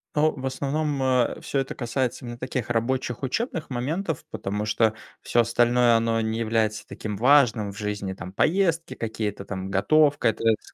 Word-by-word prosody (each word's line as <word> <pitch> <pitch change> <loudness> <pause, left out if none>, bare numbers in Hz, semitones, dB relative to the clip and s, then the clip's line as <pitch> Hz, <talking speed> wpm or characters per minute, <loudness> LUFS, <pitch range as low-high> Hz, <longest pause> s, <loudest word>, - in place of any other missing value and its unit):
Ау 155 +1 +4
в 135 0 -6
основном, 140 +2 -1
э, 125 -2 +2
всё 140 - -1
это 135 - -3
касается 125 +1 -2
именно 120 0 -6
таких, 130 -1 -3
рабочих, 125 +1 -1
учебных 165 - -2
моментов, 155 +7 -2
потому, 105 +2 -3
что 110 0 +2 0.3
всё 120 - +2
остальное- 120 0 +3
оно 115 0 +1
не 110 +1 -2
является 110 -2 0
таким 105 -2 -5
важным 120 -4 +4
в 100 - -13
жизни, 105 -2 -3
там, 90 0 -9
поездки, 165 - +1
какие-то, 110 -3 -4
там, 95 -1 -5
готовка- 145 +8 +3
это 110 - -4
это, 110 - +1
с - - -17
120 Hz, 175 wpm, -25 LUFS, 110-140 Hz, 0.3 s, Ау